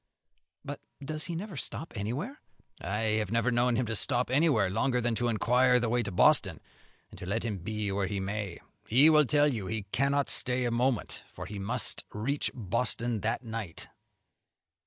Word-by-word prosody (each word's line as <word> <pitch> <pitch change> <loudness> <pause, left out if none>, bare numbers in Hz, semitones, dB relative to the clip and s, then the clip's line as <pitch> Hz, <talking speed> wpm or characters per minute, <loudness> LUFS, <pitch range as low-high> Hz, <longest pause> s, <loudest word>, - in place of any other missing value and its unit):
"But - - -6 0.2
does 155 +1 -4
he 170 - -4
never 190 +1 -6
stop 160 +2 -5
anywhere?" 130 - -4 0.4
"I 105 +4 0
have 105 - -4
never 115 +2 +2
known 120 0 +2
him 125 - +1
to 110 0 -2
stop 125 +4 +1
anywhere 135 - +3
longer 125 +7 0
than 120 -1 0
to 120 +2 -1
inquire 125 +3 +3
the 120 -1 -1
way 120 +1 +2
to 105 - -4
Boston; 90 - +4 0.5
and, - - -12
let 100 +5 -2
him 105 -4 -3
be 105 +2 -3
where 100 0 0
he 100 0 -3
may, 100 -1 -4 0.3
he 140 +8 +7
will 150 -1 +6
tell 145 +2 +3
you 105 -5 -4
he 110 +2 -3
cannot 140 +1 +1
stay 125 0 +2
a 120 - 0
moment, 120 0 -1
for - - -8
he 105 -1 -7
must 100 +1 -1
reach 135 +8 0
Boston 120 +1 -1
that 110 +5 -2
night." 110 -7 -5
115 Hz, 180 wpm, -29 LUFS, 105-130 Hz, 0.5 s, he